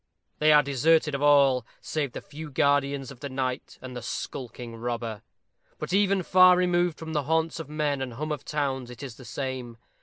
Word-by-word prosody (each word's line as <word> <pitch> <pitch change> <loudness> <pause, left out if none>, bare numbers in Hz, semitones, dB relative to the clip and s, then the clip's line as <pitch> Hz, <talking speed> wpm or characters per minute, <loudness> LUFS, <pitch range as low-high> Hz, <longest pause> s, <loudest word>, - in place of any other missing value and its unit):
They 155 0 +5
are 150 -1 +7
deserted 150 +3 +2
of 140 - -2
all, 140 -4 +5 0.2
save 145 -5 -3
the - - -6
few 155 +1 -9
guardians 140 -1 +1
of 130 - -12
the 140 - -5
night 130 -1 -3
and 130 -1 -7
the 125 - -5
skulking 120 -1 -6
robber. 115 -2 -4 0.6
But - - -5
even 200 -1 +3
far 185 +1 +6
removed 175 -2 +2
from 160 -1 -7
the 150 -3 0
haunts 160 +2 0
of 160 -3 -7
men 150 -2 -1
and 130 -2 -4
hum 155 +6 -4
of 150 -3 -3
towns 135 -4 -2
it 125 +3 -10
is 125 -5 -8
the 130 - -12
same. 125 -2 -5
140 Hz, 200 wpm, -27 LUFS, 130-155 Hz, 0.6 s, are